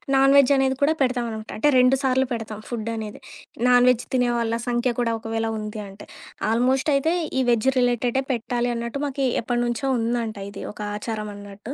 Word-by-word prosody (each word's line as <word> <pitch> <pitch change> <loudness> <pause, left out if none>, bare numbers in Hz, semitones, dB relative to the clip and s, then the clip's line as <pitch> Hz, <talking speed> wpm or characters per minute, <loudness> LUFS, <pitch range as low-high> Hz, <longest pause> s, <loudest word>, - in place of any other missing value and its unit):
Non veg 275 0 +6
అనేది 265 -1 +1
కూడా 310 +3 +4
పెడతామనమాట. 235 -4 -2
అంటే 295 +5 +4
2 255 +2 +5
సార్లు 260 0 +2
పెడతాం 220 -2 -5
ఫుడ్ 230 -2 -4
అనేది. 215 -2 -6 0.5
నాన్‌వెజ్ 245 -1 +4
తినే 245 -1 +2
వాళ్ళ 230 0 0
సంఖ్య 240 0 +1
కూడా 230 -1 0
ఒకవేళ 225 0 -2
ఉంది 215 0 -5
అంటే. 195 +1 -13 0.4
ఆల్‌మోస్ట్ 260 +5 +2
అయితే 315 +5 +2 0.3
ఈ 260 - +3
వెజ్ 235 +2 +2
రిలేటెడే 245 +1 +1
పెట్టాలి 240 +1 -1
అన్నట్టు 235 +4 -4
మాకి 275 -1 -1
ఎప్పటినుంచో 240 +2 -1
ఉందంట. 230 -2 -2
ఇది - - -8
ఒక 210 - -10 0.2
ఆచారం 215 -1 -4
అన్నట్టు. 205 +5 -9
240 Hz, 165 wpm, -23 LUFS, 225-260 Hz, 0.5 s, నాన్‌వెజ్